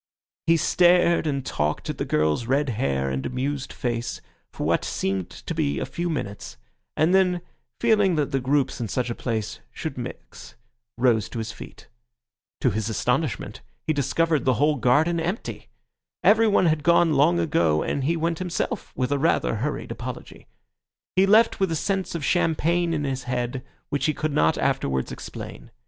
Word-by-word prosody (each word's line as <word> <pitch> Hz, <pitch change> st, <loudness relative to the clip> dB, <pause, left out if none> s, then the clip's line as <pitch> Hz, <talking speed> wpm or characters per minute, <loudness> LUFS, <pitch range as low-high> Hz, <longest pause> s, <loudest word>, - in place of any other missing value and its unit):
He 165 Hz, 0 st, +5 dB
stared 175 Hz, -1 st, +4 dB
and 140 Hz, -3 st, -2 dB
talked 75 Hz, +1 st, -2 dB
at -, -, -4 dB
the -, -, -1 dB
girl's 75 Hz, +9 st, +1 dB
red 140 Hz, +2 st, +1 dB
hair 70 Hz, -, -1 dB
and 65 Hz, 0 st, -2 dB
amused 135 Hz, +2 st, -3 dB
face 120 Hz, -1 st, -3 dB, 0.3 s
for -, -, -4 dB
what -, -, +2 dB
seemed 95 Hz, -2 st, -2 dB
to -, -, -7 dB
be 70 Hz, 0 st, 0 dB
a -, -, -2 dB
few 175 Hz, 0 st, -3 dB
minutes; 125 Hz, -10 st, -5 dB, 0.4 s
and 160 Hz, +4 st, +3 dB
then, 180 Hz, -2 st, +3 dB, 0.4 s
feeling 210 Hz, -6 st, +3 dB
that 150 Hz, -3 st, 0 dB
the 135 Hz, -, +1 dB
groups 135 Hz, 0 st, 0 dB
in 115 Hz, -, -2 dB
such 125 Hz, +3 st, -2 dB
a -, -, -1 dB
place 110 Hz, -4 st, -3 dB
should -, -, -5 dB
mix, -, -, -9 dB, 0.4 s
rose 120 Hz, -4 st, +2 dB
to -, -, -7 dB
his 110 Hz, 0 st, -3 dB
feet. -, -, -12 dB, 0.7 s
To 125 Hz, -, +3 dB
his 110 Hz, +2 st, -2 dB
astonishment, 125 Hz, +4 st, -1 dB, 0.2 s
he 155 Hz, -, +1 dB
discovered 150 Hz, +2 st, +1 dB
the 130 Hz, -2 st, +2 dB
whole 150 Hz, 0 st, +2 dB
garden 155 Hz, +8 st, +3 dB
empty. 175 Hz, +7 st, -4 dB, 0.5 s
Everyone 215 Hz, -3 st, +5 dB
had 155 Hz, -2 st, +2 dB
gone 170 Hz, 0 st, +4 dB
long 150 Hz, +5 st, +4 dB
ago, 85 Hz, -, +2 dB
and 140 Hz, -, -2 dB
he 165 Hz, +5 st, +1 dB
went 165 Hz, 0 st, -1 dB
himself 180 Hz, -2 st, -3 dB
with 130 Hz, +1 st, -1 dB
a 145 Hz, -, +1 dB
rather 150 Hz, -6 st, +1 dB
hurried 145 Hz, +7 st, -3 dB
apology. -, -, -8 dB, 0.7 s
He 190 Hz, +1 st, +4 dB
left 220 Hz, +3 st, +5 dB
with 190 Hz, -3 st, +1 dB
a -, -, 0 dB
sense 190 Hz, +2 st, -1 dB
of 155 Hz, -4 st, -3 dB
champagne 170 Hz, 0 st, +1 dB
in 155 Hz, -3 st, -1 dB
his 135 Hz, -2 st, -3 dB
head, 125 Hz, +1 st, -2 dB, 0.3 s
which 145 Hz, +1 st, 0 dB
he 155 Hz, -, 0 dB
could 155 Hz, -2 st, -2 dB
not 80 Hz, -, +3 dB
afterwards 65 Hz, -1 st, 0 dB
explain. -, -, -8 dB
145 Hz, 175 wpm, -24 LUFS, 120-170 Hz, 0.7 s, He